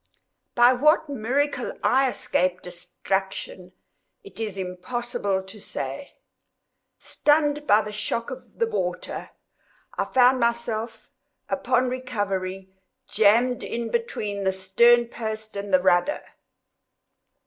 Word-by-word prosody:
By 240 +1 +6
what 305 +4 +3
miracle 270 +1 -1
I 265 +1 +3
escaped 180 -6 -1
destruction, 180 +1 -4 0.5
it 400 - -12
is 210 -3 -4
impossible 190 +1 -3
to 190 +3 -12
say. 135 - -6 0.8
Stunned 295 -1 +1
by 210 +1 +5
the 210 - -6
shock 210 +2 -3
of 260 - -10
the 465 - +2
water, 450 -1 -3 0.7
I - - +1
found 255 0 +4
myself, 235 -1 -2 0.4
upon 255 -2 +1
recovery, 195 -7 -3 0.4
jammed 230 +4 +3
in 235 0 -4
between 210 - -2
the 190 0 +1
stern 235 +6 +4
post 220 -2 -6
and 200 0 -5
rudder. 185 +8 +3
225 Hz, 105 wpm, -24 LUFS, 190-255 Hz, 0.8 s, By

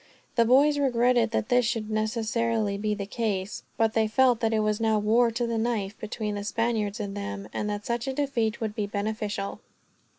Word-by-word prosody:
The 235 -1 +3
boys 285 +5 +5
regretted 245 -3 +3
that 225 0 -1
this 245 0 +4
should 220 -2 -2
necessarily 220 -1 0
be 210 +1 -1
the 200 -1 -4
case; 205 -2 -2 0.2
but 225 -1 +2
they 220 -1 +2
felt 245 +1 +3
that 225 -1 +1
it 220 -1 +2
was 215 +1 0
now 220 -1 +3
war, 225 +3 +3
to 235 +1 -1
the 230 -1 -1
knife, 220 -3 -1
between 215 0 -4
the 205 0 -4
Spaniards 220 -1 -1
and 200 -1 -4
them, 205 0 -5
and 210 - -2
that 205 0 -4
such 235 +1 -2
a 265 - -1
defeat 255 -6 -1
would 220 -2 -2
be 210 -1 -2
beneficial. 205 -1 -3
220 Hz, 200 wpm, -27 LUFS, 210-235 Hz, 0.2 s, boys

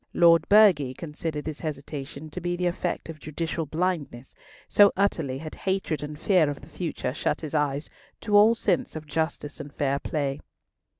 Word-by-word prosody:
Lord 170 -1 +5
Burghley 185 -12 +5
considered 150 0 -5
this 155 -1 -5
hesitation 145 0 -6
to 180 - -6
be 175 0 -1
the 180 0 -2
effect 175 0 -2
of 160 -1 -8
judicial 160 +1 -3
blindness—so 180 - 0
utterly 165 -9 0
had 155 +2 -7
hatred 190 -5 -2
and 150 0 -6
fear 175 -4 +3
of 145 - -5
the 140 - -13
future 155 -6 -3
shut - - -1
his 155 -2 -6
eyes 145 -1 0 0.3
to 210 - 0
all 215 +3 +7
sense 195 -8 0
of 155 -1 -6
justice 150 0 -3
and 145 -1 -7
fair 140 -1 0
play. 140 -2 -2
155 Hz, 170 wpm, -26 LUFS, 145-175 Hz, 0.3 s, all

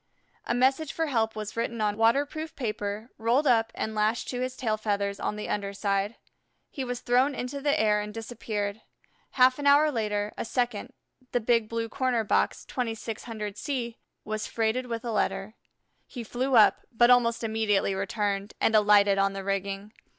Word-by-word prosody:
A - - +1
message 270 +4 +2
for 325 - 0
help 225 -6 0
was 215 -1 -5
written 230 0 -2
on 210 -1 +1
waterproof 280 +8 +1
paper, 215 -2 -4
rolled 240 +6 +2
up, 230 -4 +3
and 220 - -3
lashed 215 +2 0
to 250 -1 -3
his 255 0 -3
tail 220 -4 0
feathers 200 -2 -2
on - - -2
the 210 - -5
under 200 -1 -2
side. 200 +1 -1 0.6
He 270 - -4
was 245 -1 -4
thrown 255 +3 +2
into 255 +3 -4
the 285 0 +2
air 210 -1 +3
and 210 0 -6
disappeared. 220 -2 -4 0.5
Half 255 +1 +5
an 285 - 0
hour 295 +2 +6
later, 210 -4 -2
a - - -1
second, 240 -3 -2 0.4
the 245 - +3
Big 230 -1 +1
Blue 230 0 -2
Corner 245 -1 0
box, 205 - 0
2600 225 -3 -4
C, 240 -4 -3 0.3
was 215 0 -3
freighted 230 +3 -1
with 230 0 -4
a 235 - -2
letter. 210 -1 -1 0.5
He 245 - -7
flew 255 +3 -1
up, 215 -3 +6
but 240 +1 +5
almost 235 -2 +3
immediately 220 -3 +1
returned 200 +1 -2
and 225 - +2
alighted 205 -2 +5
on 195 0 +2
the 195 0 -5
rigging. 195 +1 -3
225 Hz, 175 wpm, -27 LUFS, 210-245 Hz, 0.6 s, hour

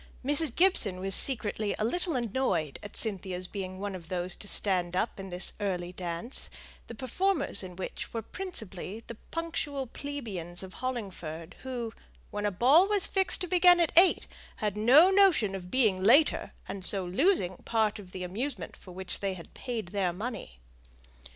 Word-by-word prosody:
Mrs. 290 -2 +1
Gibson 285 - +3
was 195 +1 0
secretly 215 -4 +2
a 215 - 0
little 350 +5 -1
annoyed 215 - -1
at 205 - -10
Cynthia's 185 -4 -2
being 185 -1 -6
one 200 +1 -4
of 175 -3 -9
those 180 -1 0
to 205 - -10
stand 180 -4 +1
up 205 +2 -1
in 195 0 -7
this 180 +1 -3
early 180 -4 -2
dance, 175 +7 -5 0.4
the 235 - -8
performers 365 - 0
in 185 -2 -8
which 185 - -6
were 230 -1 -4
principally 220 - -4
the - - -7 0.2
punctual 310 -5 -3
plebeians 215 - -6
of 185 - -9
Hollingford, 185 -10 -5
who, 245 -4 -4 0.4
when 205 0 -1
a - - 0
ball 270 - +5
was 410 -2 +1
fixed 385 0 -1
to 360 - -1
begin 355 0 +6
at 335 -3 +2
eight, 355 +2 +6 0.3
had 210 -2 -2
no 265 - +7
notion 375 - +4
of 180 -2 -6
being 215 -6 +2
later, 280 +10 +4 0.2
and 195 - -6
so 190 0 +6
losing 185 - +2
part 220 -2 0
of 185 -3 -12
the 185 -1 -6
amusement 195 - -4
for 185 - -13
which 185 0 -6
they 195 -1 -2
had 170 - -12
paid 230 -7 -5
their 190 -2 0
money. 205 - -6
210 Hz, 170 wpm, -29 LUFS, 185-270 Hz, 0.4 s, no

